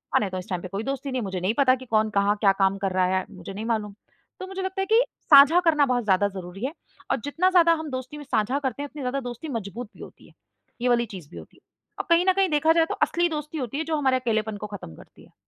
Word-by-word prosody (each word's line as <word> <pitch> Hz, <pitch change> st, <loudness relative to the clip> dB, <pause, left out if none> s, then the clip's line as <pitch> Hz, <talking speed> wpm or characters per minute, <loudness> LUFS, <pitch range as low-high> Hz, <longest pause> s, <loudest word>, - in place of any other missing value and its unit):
मानें 205 Hz, -, +2 dB
तो 185 Hz, -, -4 dB
इस 180 Hz, -, -10 dB
टाइम 180 Hz, -2 st, -2 dB
पे 185 Hz, -, -6 dB
कोई 195 Hz, +3 st, -4 dB
दोस्ती 275 Hz, +2 st, -4 dB
नहीं 255 Hz, -1 st, -1 dB
मुझे 190 Hz, -3 st, -4 dB
नहीं 190 Hz, +4 st, +1 dB
पता 265 Hz, -2 st, +5 dB
कि 260 Hz, 0 st, -11 dB
कौन 220 Hz, -2 st, +1 dB
कहाँ? 200 Hz, 0 st, +2 dB
क्या 200 Hz, -3 st, +5 dB
काम 195 Hz, 0 st, +2 dB
कर 195 Hz, -1 st, -2 dB
रहा 185 Hz, 0 st, +2 dB
है? 185 Hz, -, -2 dB
मुझे 190 Hz, -1 st, -9 dB
नहीं 210 Hz, +3 st, -6 dB
मालूम। 215 Hz, -3 st, -2 dB, 0.5 s
तो 375 Hz, -, -6 dB
मुझे 385 Hz, 0 st, -5 dB
लगता 380 Hz, +1 st, -3 dB
है -, -, 0 dB
कि 450 Hz, +3 st, +5 dB, 0.3 s
साँझा 285 Hz, +4 st, +9 dB
करना 305 Hz, -3 st, +4 dB
बहुत 250 Hz, -2 st, 0 dB
ज़्यादा 200 Hz, -1 st, +2 dB
ज़रूरी 190 Hz, +2 st, -7 dB
है 280 Hz, -, -3 dB, 0.4 s
और -, -, +2 dB
जितना 335 Hz, +6 st, +1 dB
ज़्यादा 340 Hz, -2 st, +5 dB
हम 315 Hz, -, -6 dB
दोस्ती 260 Hz, +3 st, -6 dB
में 295 Hz, -, -8 dB
साँझा 250 Hz, +1 st, 0 dB
करते 275 Hz, 0 st, -3 dB
हैं 290 Hz, -, -6 dB
उतनी 295 Hz, -, -9 dB
ज़्यादा 255 Hz, +2 st, -1 dB
दोस्ती 245 Hz, +5 st, -7 dB
मज़बूत 230 Hz, -1 st, -5 dB
भी -, -, -14 dB
होती -, -, -14 dB
है, -, -, -21 dB, 0.5 s
ये 250 Hz, -, +1 dB
वाली 240 Hz, -1 st, +3 dB
चीज़ 165 Hz, -6 st, -10 dB
भी -, -, -11 dB
होती -, -, -13 dB
है। -, -, -25 dB, 0.4 s
अब -, -, -3 dB
कहीं 340 Hz, +1 st, +4 dB
न -, -, +5 dB
कहीं 385 Hz, 0 st, +2 dB
देखा 310 Hz, +1 st, +3 dB
जाए 330 Hz, -1 st, +3 dB
तो -, -, -2 dB
असली 345 Hz, 0 st, +1 dB
दोस्ती 300 Hz, 0 st, -5 dB
होती 260 Hz, -1 st, -4 dB
है -, -, 0 dB
जो 320 Hz, 0 st, -1 dB
हमारे 265 Hz, -3 st, +2 dB
अकेलेपन 220 Hz, -3 st, -1 dB
को 210 Hz, -, -6 dB
खत्म 200 Hz, -, -9 dB
करती -, -, -17 dB
है। -, -, -25 dB
250 Hz, 285 wpm, -25 LUFS, 205-300 Hz, 0.5 s, साँझा